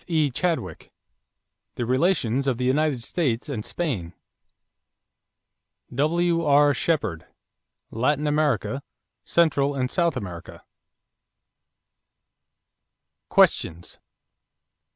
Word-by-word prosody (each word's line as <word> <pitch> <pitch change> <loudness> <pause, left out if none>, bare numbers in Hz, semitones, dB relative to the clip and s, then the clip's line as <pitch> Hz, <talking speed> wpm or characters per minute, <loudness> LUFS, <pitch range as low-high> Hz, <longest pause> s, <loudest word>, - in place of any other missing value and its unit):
E. 155 -5 +1
Chadwick, 125 - -3 0.8
The 120 - -2
Relations 130 -1 +1
of 130 -3 +1
the 125 - -2
United 135 -1 +1
States 130 -4 -1
and 125 -8 -4
Spain. 110 - -3 1.8
W.R. 150 0 +3
Shepherd, 110 - -1 0.6
Latin 145 +6 0
America; 145 -5 0 0.4
Central 145 -4 +2
and 130 -1 -1
South 170 -6 +1
America. 90 -7 -8 2.7
=Questions= 85 +2 +2
1. - - -50
140 Hz, 80 wpm, -24 LUFS, 120-155 Hz, 2.7 s, W.R